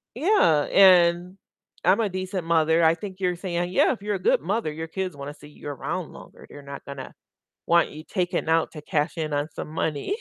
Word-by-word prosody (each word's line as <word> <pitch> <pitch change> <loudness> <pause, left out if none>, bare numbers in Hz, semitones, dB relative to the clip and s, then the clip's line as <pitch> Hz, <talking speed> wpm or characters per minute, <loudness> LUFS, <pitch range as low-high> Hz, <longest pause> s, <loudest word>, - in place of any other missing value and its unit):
Yeah, 250 - +3
and 180 -1 +5 0.5
I'm 185 +4 +4
a 215 - 0
decent 185 -1 -4
mother. 165 0 +3
I 160 0 +5
think 190 0 -8
you're 180 -2 0
saying, 175 -1 -3
"Yeah, 185 - +3
if 230 - -10
you're 205 0 -2
a - - -4
good 180 - +2
mother, 190 +1 -1
your 160 +2 -6
kids 185 0 -4
wanna 140 +1 -7
see 150 - -15
you 145 0 -10
around 140 -3 -4
longer," - - -14
they're 145 - -11
not 140 0 -9
gonna 140 -2 -8 0.5
want 170 0 +3
you 155 +1 -10
taking 180 -4 -2
out 165 0 +2
to 150 - -9
cash 150 +3 -1
in 155 -2 -2
on 145 +1 -1
some - - -6
money. 160 - -2
170 Hz, 210 wpm, -25 LUFS, 155-185 Hz, 0.5 s, and